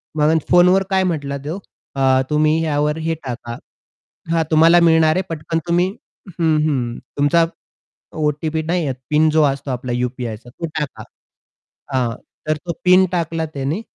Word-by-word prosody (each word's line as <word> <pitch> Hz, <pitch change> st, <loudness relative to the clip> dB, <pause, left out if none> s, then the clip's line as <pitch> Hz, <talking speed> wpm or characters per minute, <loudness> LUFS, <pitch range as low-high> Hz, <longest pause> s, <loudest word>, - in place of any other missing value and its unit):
मग 155 Hz, +1 st, +3 dB
फोन 175 Hz, 0 st, +6 dB
वर 190 Hz, +1 st, +3 dB
काय 190 Hz, -1 st, +2 dB
म्हंटला 145 Hz, -6 st, -2 dB
तो 165 Hz, +6 st, -4 dB, 0.4 s
अ, 130 Hz, -1 st, +3 dB
"तुम्ही 155 Hz, +1 st, +2 dB
ह्यावर 150 Hz, 0 st, 0 dB
हे 165 Hz, -, 0 dB
टाका." 120 Hz, -2 st, -6 dB, 0.7 s
हां, 165 Hz, -1 st, +2 dB
तुम्हाला 165 Hz, +2 st, +6 dB
मिळणार 160 Hz, -2 st, +4 dB
आहे 185 Hz, -, +1 dB
पटकन 165 Hz, 0 st, -3 dB
तुम्ही 175 Hz, +1 st, +2 dB, 0.5 s
हं, 160 Hz, -2 st, +3 dB
हं. 125 Hz, -5 st, -2 dB, 0.2 s
तुमचा 145 Hz, +4 st, +3 dB, 0.7 s
ओ-टी-पी 155 Hz, +1 st, -1 dB
नाही, 165 Hz, -3 st, -1 dB, 0.2 s
पिन 155 Hz, +1 st, +4 dB
जो 155 Hz, 0 st, +3 dB
असतो 140 Hz, -1 st, -1 dB
आपला 125 Hz, 0 st, -4 dB
यू-पी-आयचा 120 Hz, -2 st, -4 dB
तो 150 Hz, +7 st, -6 dB
टाका. 150 Hz, -3 st, -5 dB, 0.9 s
हां, 120 Hz, -3 st, 0 dB, 0.3 s
तर 155 Hz, 0 st, +1 dB
तो 170 Hz, -, -2 dB
पिन 185 Hz, +1 st, +6 dB
टाकला 165 Hz, -2 st, -1 dB
त्याने 140 Hz, +8 st, -2 dB
155 Hz, 150 wpm, -19 LUFS, 135-165 Hz, 0.9 s, फोन